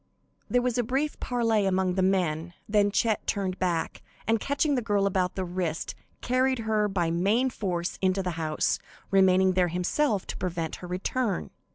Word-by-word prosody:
There 245 0 +2
was 250 -1 0
a - - +3
brief 270 +6 -1
parley 225 -5 +1
among 185 -1 +1
the 190 - 0
men, 175 -3 0
then 205 -1 +3
Chet 215 +1 0
turned 190 -2 -1
back, 175 -3 -1 0.2
and, 225 0 +2
catching 285 +5 +1
the 255 - +1
girl 205 -3 +1
about 185 -2 0
the 190 - -2
wrist, 175 -2 -3 0.3
carried 255 +1 +2
her 215 -1 +2
by 175 -4 0
main 210 +10 +2
force 175 -6 -3
into 190 0 +2
the 180 - -1
house, 160 -2 0 0.3
remaining 190 -1 +5
there 180 -1 +2
himself 190 - 0
to - - -6
prevent 170 -3 -3
her 180 - -9
return. 185 - -2
190 Hz, 175 wpm, -27 LUFS, 180-225 Hz, 0.3 s, remaining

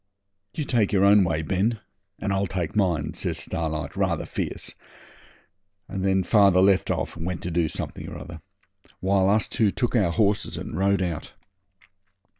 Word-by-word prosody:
'You 155 - -1
take 120 -7 +1
your 100 -1 +3
own 100 0 +6
way, 80 -3 -1
Ben, 100 +6 0 0.4
and 100 -2 -2
I'll 95 0 0
take 85 -3 -3
mine,' 90 -8 +1
says - - -3
Starlight 80 -3 -3
rather - - 0
fierce, - - -4 1.1
and 95 -1 -4
then 95 -1 +2
father 100 -2 +5
left 95 0 +4
off - - -2
and 85 - -7
went 90 0 -4
to 90 - -3
do 85 -1 +1
something - - -5
or - - -7
other, - - -9 0.6
while 95 0 +2
us 105 +2 +2
two 110 -3 +1
took 120 +4 -1
our 95 -7 +3
horses 100 0 +1
and - - -6
rode 100 0 +2
out. 85 -4 -4
95 Hz, 170 wpm, -25 LUFS, 85-100 Hz, 1.1 s, own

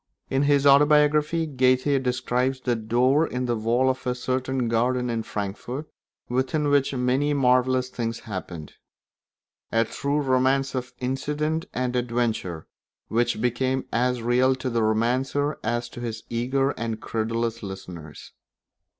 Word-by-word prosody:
In 135 - +2
his 140 -1 +3
autobiography 150 +3 +4
Goethe 130 -1 +2
describes 125 +1 0
the 125 -2 0
door 125 +7 +2
in 125 0 -3
the 120 -1 0
wall 115 +4 +1
of 130 -1 -1
a 125 - 0
certain 130 0 -1
garden 125 +2 +1
in 115 -1 -1
Frankfort 110 +8 -5 0.4
within 130 +4 0
which 145 -1 +3
many 130 +4 +1
marvellous 130 -1 +2
things 115 -2 -4
happened; 90 -7 -7 1.0
a 115 0 +3
true 140 +6 -1
romance 135 0 +2
of 125 -1 -4
incident 150 +5 -2
and 125 0 -2
adventure 115 -9 -1 0.4
which 115 -1 +1
became 130 +2 0
as 125 0 +1
real 125 +2 +3
to 130 0 -4
the 115 0 +1
romancer 125 +7 0
as 120 +2 -1
to - - -10
his 115 -2 -5
eager 130 +4 +1
and 115 -4 -4
credulous 115 +1 -2
listeners. 90 -6 -9
125 Hz, 135 wpm, -25 LUFS, 115-135 Hz, 1.0 s, autobiography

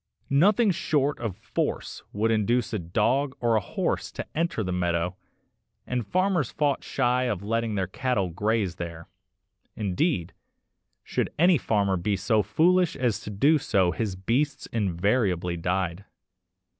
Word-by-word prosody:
Nothing 200 +9 +4
short 150 -5 0
of 110 -6 -4
force - - -3
would 110 +2 +1
induce 115 +3 +1
a 105 - 0
dog 115 +11 0
or 120 -2 +2
a - - +4
horse - - -2
to - - -5
enter 165 -8 0
the 90 - -3
meadow, 90 0 0 0.7
and 125 -4 -2
farmers 185 - +1
fought 145 -3 0
shy 125 -1 +1
of 100 -6 -2
letting 115 +1 -1
their 95 -2 0
cattle 100 -1 -1
graze 105 -1 0
there; 85 -1 -7 0.7
indeed, 100 - -1 0.7
should - - -2
any 175 -1 +5
farmer 100 -4 +1
be 100 +4 0
so 100 +3 +2
foolish 170 - +2
as 120 -4 0
to - - -8
do 140 +10 +3
so 100 -10 +2
his 100 +3 -2
beasts 125 +10 -1
invariably 95 -3 +1
died. 90 +1 -2
110 Hz, 145 wpm, -26 LUFS, 95-135 Hz, 0.7 s, any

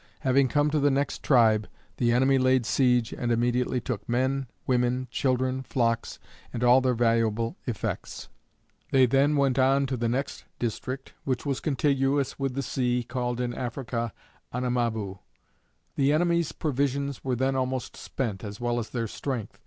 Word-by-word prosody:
Having 135 +1 +3
come 145 +2 +2
to 155 - +2
the 145 0 +3
next 140 +1 -1
tribe, 110 -5 +4 0.3
the 120 -1 +2
enemy 130 +2 +3
laid 130 -1 +3
siege 125 -2 +2
and 120 -1 -2
immediately 120 +2 +1
took 115 -3 -5
men, 130 +2 0 0.2
women, 125 0 +1
children, 130 0 0
flocks, 115 -3 -1 0.3
and 120 - -3
all 125 +2 +6
their 130 -1 +1
valuable 115 -1 +1
effects. 120 -4 -4 0.6
They 130 -1 +5
then 140 +4 +3
went 135 -2 +2
on 135 +1 +4
to 130 -1 -2
the 115 0 0
next 135 +4 -3
district 130 +3 -4
which 130 +1 -2
was 140 -2 -1
contiguous 140 -1 0
with 135 -2 -2
the 140 - -1
sea, 125 -1 0
called 125 0 -3
in 120 -1 -1
Africa, 120 -2 -3 0.4
Anamaboo. 115 -6 -1 0.8
The 140 0 +3
enemies 170 0 +2
provisions 140 -1 -1
were 130 -2 0
then 130 +2 0
almost 130 -1 -2
spent, 110 -8 -4
as 105 -1 -7
well 120 0 0
as 115 - -5
their 115 -2 -2
strength. 120 -1 -5
125 Hz, 160 wpm, -27 LUFS, 120-135 Hz, 0.8 s, all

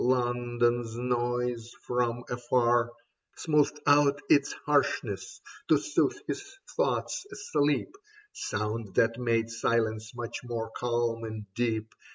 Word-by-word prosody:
London's 120 -2 +1
noise 120 -1 -1
from 120 -1 0
afar 120 -1 +2 0.5
Smoothed 150 -1 +2
out 145 0 +5
its 145 -1 +5
harshness 145 -1 0 0.3
to - - +6
soothe - - +1
his 400 - -3 0.3
thoughts - - 0
asleep, 150 - 0 0.4
Sound 105 0 -3
that 115 +1 +3
made 115 -2 +1
silence 110 -1 0
much 120 -1 -4
more 115 -2 -4
calm 120 -1 0
and 110 -1 -5
deep. 110 -1 -1
120 Hz, 110 wpm, -29 LUFS, 115-125 Hz, 0.5 s, to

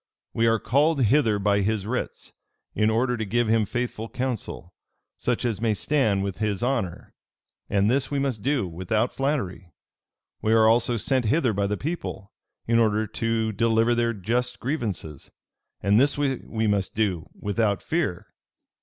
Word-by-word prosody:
We 115 0 +2
are 115 0 +4
called 140 +5 +2
hither 115 -2 +3
by 100 0 +2
his 105 0 0
writs, 125 +4 -4 0.4
in 105 +1 +2
order 120 +2 +1
to 110 - -2
give 120 +3 0
him 110 -1 +2
faithful 115 -1 -3
counsel; 120 -8 -4 0.4
such 125 0 -1
as 110 -3 -1
may 110 -2 +2
stand 110 -6 +1
with 100 -1 -4
his 105 -2 -1
honor: 120 -9 -2 0.6
and 100 0 +2
this 130 +4 +1
we 145 - -1
must 135 -6 -1
do 135 -4 0
without 95 +7 -1
flattery. 125 - -2 0.7
We 110 - +2
are 110 -1 +5
also 120 +1 +3
sent 125 +3 0
hither 130 0 +2
by 100 0 0
the 105 +1 -1
people, 140 - -5 0.3
in 115 0 +3
order 110 -1 +2
to 110 +1 -1
deliver 115 +2 +2
their 120 0 +1
just 120 +5 -1
grievances: 105 - -4 0.5
and 100 +3 +4
this 140 +3 +3
we 130 -5 -1
must 100 -2 0
do 95 -7 -1
without 105 -1 0
fear. 160 - -1
110 Hz, 160 wpm, -25 LUFS, 100-125 Hz, 0.7 s, are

